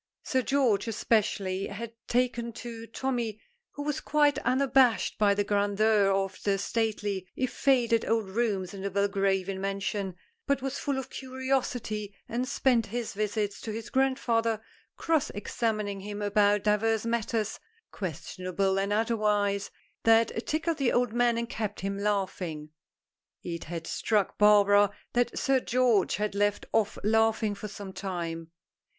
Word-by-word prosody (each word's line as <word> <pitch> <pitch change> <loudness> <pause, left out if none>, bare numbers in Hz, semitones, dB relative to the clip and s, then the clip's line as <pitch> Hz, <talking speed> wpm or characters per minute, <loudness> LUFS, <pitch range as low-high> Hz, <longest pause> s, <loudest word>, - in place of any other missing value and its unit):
Sir 260 - +1
George, 250 -5 +2
especially, 200 -4 0
had 230 +3 -6
taken 240 -1 0
to 230 -1 -8
Tommy, 235 -3 -2 0.3
who 290 - -5
was 295 -1 -2
quite 295 -1 +3
unabashed 260 -2 +3
by 205 -1 +4
the 205 - +1
grandeur 205 0 +2
of 195 0 -1
the 200 -1 +2
stately, 205 -2 -1
if 255 -1 -2
faded, 240 -4 +3
old 225 -3 +1
rooms 200 -3 -1
in 195 - -7
the 200 - -2
Belgravian 195 -1 0
mansion, 195 -1 -2 0.3
but 280 -1 +2
was 270 +1 -3
full 280 -2 -1
of 265 - -5
curiosity, 255 -6 -2
and 245 +3 -2
spent 250 -4 +2
his 235 +1 -4
visits 210 0 -2
to 220 - -5
his 225 +2 -6
grandfather 235 -4 +1 0.4
cross 320 -3 +1
examining 210 -1 -2
him 205 +1 -6
about 205 0 +3
divers 215 +1 +2
matters 225 -2 -1 0.3
questionable 190 +1 -2
and 200 +1 -1
otherwise 210 -2 +1 0.3
that 225 0 +3
tickled 325 +1 0
the 270 -5 +2
old 245 -2 +1
man 240 -1 +2
and 235 0 -2
kept 215 -3 -4
him 195 +1 -3
laughing. 185 -7 -2 0.7
It 170 -1 -5
had 165 0 -5
struck 210 +3 0
Barbara 205 -1 +6 0.2
that 240 0 +1
Sir 270 -2 +2
George 245 -5 +2
had 210 0 -2
left 205 0 0
off 220 -2 +1
laughing 220 0 +2
for 205 +1 -6
some 200 -2 -8
time. 170 -4 -4
215 Hz, 145 wpm, -28 LUFS, 200-240 Hz, 0.7 s, Barbara